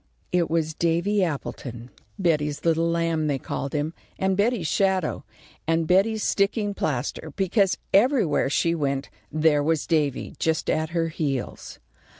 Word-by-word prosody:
It 175 -2 +2
was 160 -1 0
Davy 170 +5 +1
Appleton. 130 -6 -5 0.3
Betty's 150 -6 0
little 165 0 +2
lamb, 165 -2 0
they 145 -2 +1
called 135 +1 -4
him, 150 +2 -1 0.2
and 190 0 +1
Betty's 205 -2 +1
shadow, 190 0 +1 0.4
and 165 0 +2
Betty's 200 +5 +3
sticking 205 +1 +1
plaster, 150 -1 -3
because 195 0 +2 0.2
everywhere 205 - +3
she 165 +3 +2
went 140 -3 -2 0.2
there 155 -1 +3
was 155 0 +1
Davy 150 -5 0
just 160 -1 +1
at 155 0 0
her 165 -1 0
heels. 140 -5 -3
165 Hz, 140 wpm, -25 LUFS, 150-190 Hz, 0.4 s, Betty's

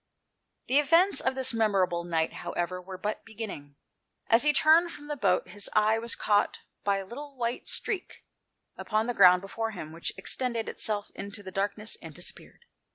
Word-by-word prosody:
The 270 +3 +4
events 335 +7 +4
of 265 - 0
this 260 -1 +1
memorable 195 -6 +1
night, 165 -2 0
how - - -6
ever, 180 +1 -2
were 185 +1 -8
but 210 +3 -3
beginning. 200 -11 -8 0.6
As 230 +1 +7
he 300 - +4
turned 320 +4 +5
from 290 - -11
the 295 0 -3
boat 185 -7 +1
his 205 +2 -3
eye 215 +1 +3
was 235 +1 -3
caught 205 -1 +2 0.3
by 200 -1 +2
a 195 - -5
white 250 +1 -5
streak 390 -4 -2 0.5
upon 215 0 -1
the 245 - -1
ground 180 -3 +7
before 225 +3 -3
him, 155 -5 -7
which 165 +1 -4
extended 235 +3 -1
itself 210 -2 -1
into 200 +1 -7
the 190 - -8
darkness 205 +3 -2
and - - -10
disappeared. 475 - -7
215 Hz, 175 wpm, -28 LUFS, 190-250 Hz, 0.6 s, As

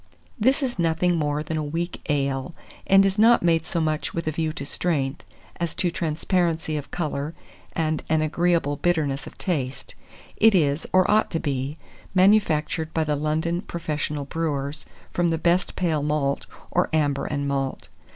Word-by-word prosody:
This 265 +6 +3
is 245 -7 -2
nothing 170 +1 +2
more 150 -1 0
than 160 +1 -3
a 155 - -1
weak 165 +4 -3
ale, 140 +2 -1 0.3
and 195 0 +6
is 195 +1 0
not 230 -1 +6
made 165 -1 +2
so 175 - -1
much 155 -1 -1
with 170 - -2
a 155 - 0
view 160 0 -1
to 140 - -6
strength, 145 -3 -1 0.3
as 170 -2 -3
to 175 - 0
transparency 165 0 0
of 145 -2 -4
colour 155 -2 -3 0.4
and 155 -2 0
an 155 0 +3
agreeable 165 -2 +1
bitterness 150 -5 0
of - - -12
taste. 135 -8 -3 0.4
It 220 -1 +6
is, 145 -3 +2
or 185 +1 +4
ought 215 +1 +3
to 165 - -1
be, 140 0 -2 0.4
manufactured 175 -5 +3
by 160 - +2
the 150 -1 0
London 160 +4 0
professional 150 -5 -3
brewers, 145 -1 -3 0.3
from 175 -1 +2
the 165 -1 +1
best 175 +3 +1
pale 165 -5 0
malt, 145 -1 0 0.2
or - - +2
amber 145 -3 +1
and 140 -1 -2
malt. 135 -1 -2
160 Hz, 170 wpm, -24 LUFS, 145-175 Hz, 0.4 s, and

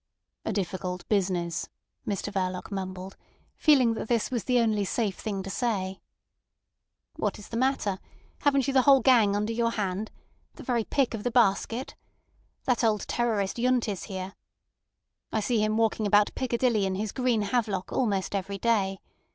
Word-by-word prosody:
"A - - -1
difficult 185 -2 -3
business," 180 -5 0 0.4
Mr 205 0 -3
Verloc 185 0 -2
mumbled, 190 -1 -5 0.4
feeling 260 -7 +4
that 225 - -5
this 235 0 0
was 240 -4 -2
the 250 -1 +2
only 220 -3 +2
safe 200 0 -1
thing 200 -3 -3
to 195 - -6
say. 190 -5 -2 1.2
"What - - -1
is 210 - -12
the 230 - -3
matter? 240 -7 0 0.4
Haven't 275 -3 +2
you 275 - 0
the 265 - +6
whole 270 0 +6
gang 225 -6 +5
under 210 +2 -1
your 230 0 +1
hand? 205 -1 -2 0.5
The - - -10
very 235 -3 0
pick 275 -4 +1
of 225 - -4
the 245 - +1
basket? 235 +2 +1 0.7
That 250 -2 +1
old 215 -2 +1
terrorist 220 -5 0
Yundt 250 -1 +2
is 200 -3 -4
here. 190 -1 -6 1.0
I 220 - +1
see 220 0 +1
him 215 0 +1
walking 225 -1 +1
about 205 +1 +4
Piccadilly 235 -5 +1
in 190 - -2
his 205 +1 -2
green 250 -4 +1
havelock 205 -3 -1
almost 200 -7 0
every 200 0 -2
day. 195 -3 +1
215 Hz, 165 wpm, -27 LUFS, 195-240 Hz, 1.2 s, the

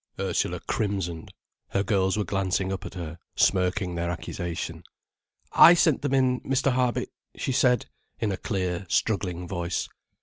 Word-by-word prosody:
Ursula - - -1
crimsoned. 95 -6 -2 0.4
Her 100 - 0
girls 95 -1 +1
were 105 - +1
glancing 95 -1 -1
up 95 - -5
at - - -11
her, 85 -2 -6 0.2
smirking 90 0 +2
their 85 0 -2
accusation. 85 -1 -4 0.7
"I 175 - +9
sent 160 -5 +3
them 140 -1 0
in, 130 -1 +2
Mr. 135 +1 +1
Harby," 125 -1 +1 0.3
she - - -2
said, 125 -2 +3 0.3
in 110 - 0
a 95 - -2
clear, 95 -2 -2
struggling 90 -1 0
voice. 85 -1 -2
95 Hz, 145 wpm, -26 LUFS, 90-115 Hz, 0.7 s, I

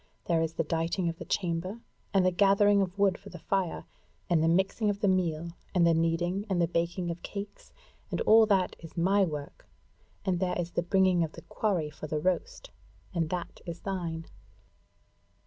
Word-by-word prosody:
There 165 -2 +2
is 165 0 -1
the 165 - 0
dighting 165 +3 -1
of 165 - -6
the - - -6
chamber, 185 +4 -2 0.3
and 195 -3 +3
the 185 - +4
gathering 200 +2 +4
of 190 0 -2
wood 195 -2 +2
for - - -12
the - - -9
fire, 190 -3 -2 0.5
and 165 -2 +4
the 160 - +3
mixing 190 +5 +2
of 200 -1 -1
the 205 - +3
meal, 170 -3 0 0.2
and 175 -2 +5
the 170 - +5
kneading 175 +5 0
and 185 -2 +1
the 170 - +3
baking 170 +1 -1
of 170 - -7
cakes; 200 0 -7 0.4
and - - -2
all 220 0 +6
that 195 -3 +2
is 165 0 -12
my 195 +4 +3
work, 150 -5 -5 0.6
and 180 -2 +1
there 180 -1 0
is 175 0 -3
the - - 0
bringing 185 0 +3
of 160 - -4
the - - -11
quarry 180 -9 -1
for 155 +1 -8
the 155 - -2
roast, 485 - -2 0.4
and 165 -3 0
that 180 0 -5
is 170 0 -6
thine." 170 -4 -3
180 Hz, 195 wpm, -29 LUFS, 165-195 Hz, 0.6 s, all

